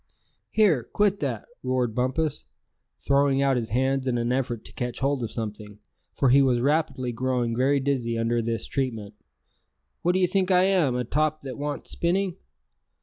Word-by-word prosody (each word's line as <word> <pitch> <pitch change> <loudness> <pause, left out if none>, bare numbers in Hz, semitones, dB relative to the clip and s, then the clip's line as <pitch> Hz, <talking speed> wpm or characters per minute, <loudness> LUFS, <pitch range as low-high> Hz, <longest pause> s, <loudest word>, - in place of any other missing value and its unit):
"Here, 185 - +3
quit 205 - +1
that!" 125 -7 -3 0.2
roared 125 -3 0
Bumpus, 130 - -1 0.6
throwing 140 -1 +2
out 135 -1 +3
his 120 -2 -2
hands 130 +3 0
in 125 -1 +1
an 120 +1 -1
effort 120 -3 -2
to - - -12
catch 125 -1 -4
hold 140 0 0
of 115 -2 -3
something, 105 -2 -6 0.4
for 135 - +2
he 135 +3 +6
was 130 -3 +3
rapidly 140 -2 0
growing 120 -1 -1
very 135 +3 +2
dizzy 130 -4 -1
under 115 +1 +1
this 115 -1 -2
treatment; 115 -7 -3 0.9
"what 175 - +2
d'ye 185 0 +3
think 190 +1 0
I 180 -1 +5
am, 180 -10 +2
a 125 - 0
top 155 +5 0
that 135 -2 -7
wants 145 0 -4
spinning? 185 +1 0
130 Hz, 170 wpm, -25 LUFS, 120-150 Hz, 0.9 s, he